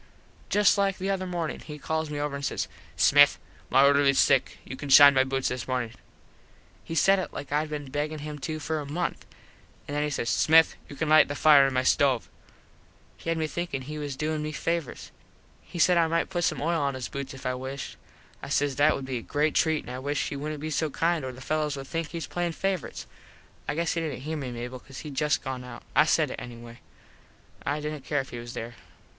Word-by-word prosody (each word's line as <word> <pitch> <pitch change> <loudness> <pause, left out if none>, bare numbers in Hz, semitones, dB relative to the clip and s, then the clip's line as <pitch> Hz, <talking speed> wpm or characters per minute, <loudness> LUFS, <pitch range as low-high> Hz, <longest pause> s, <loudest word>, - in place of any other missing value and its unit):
Just 205 0 +4
like 195 -1 +1
the 195 +1 -2
other 185 -1 -2
mornin 170 -3 -3
he 150 -1 -9
calls 160 +1 -2
me 145 -1 -4
over 145 -1 -2
an 140 - -5
says, 140 - -2 0.3
"Smith, 145 0 +6 0.3
my 135 +2 +6
orderlies 140 -1 +4
sick. 135 -3 +3
You - - -7
can 145 +1 -7
shine 140 +1 +9
my 130 -1 +4
boots 135 0 -1
this 125 -1 -4
mornin." 125 -3 -2 0.9
He 165 - -6
said 195 +5 +4
it 185 - -5
like 145 - -7
Id 150 +1 0
been 145 -3 -6
beggin 150 +2 -2
him 150 0 -7
to 155 +3 -4
for 155 +1 -2
a 145 - -5
month. 175 +4 -3 0.6
An 145 - -5
then 145 - 0
he 150 - 0
says, 125 -4 -3
"Smith 160 +6 +5 0.2
you 145 - -9
can 160 - -2
lite 155 +1 +6
the 145 - -4
fire 145 -2 +6
in 135 - -3
my 130 - +2
stove." 130 -2 +2 0.9
He - - -7
had 165 - +1
me 160 - 0
thinkin 155 -4 -4
he 150 +3 -6
was 145 -2 -4
doin 155 +2 -2
me 155 0 -3
favors. 165 -1 -3 0.5
He - - -10
said 175 +1 +4
I 165 - +3
might 165 +3 0
put 175 -2 0
some - - -1
oil 165 0 +1
on 140 -1 0
his 130 -2 -4
boots 140 -1 -6
if 135 - -12
I 125 - 0
wished. 130 +2 -6 0.5
I - - -7
says 145 -1 0
that 145 +2 +4
would 135 - -5
be 130 -1 -3
a - - -9
great 150 +5 0
treat 160 -2 +2
an - - -9
I 125 - -5
wished 145 +2 -1
he - - -5
wouldnt 150 +1 -5
be 155 +1 -4
so 155 +2 0
kind 165 +1 0
or 130 - -4
the 130 +1 -12
fellos 150 0 -1
would 135 - -6
think 165 +3 -3
he 170 - -7
was 165 - -4
playin 175 -1 -2
favorites. 195 0 -3 0.6
I 145 - -1
guess 165 +1 0
he 165 - -1
didnt 145 -5 -4
here 155 +2 -3
me 135 -4 -4
Mable 125 +1 -6
cause 135 +1 -11
hed 150 -2 -8
just 150 +2 +1
gone 130 -2 -4
out. 125 -1 -10
I 150 - +6
said 155 -3 +2
it - - -6
anyway. 120 0 -10 0.8
I 145 +1 -1
didnt 150 -2 -5
care 145 -2 0
if 135 - -12
he 120 - -6
wasnt 120 0 -8
there. 115 +1 -6
145 Hz, 240 wpm, -27 LUFS, 135-160 Hz, 0.9 s, shine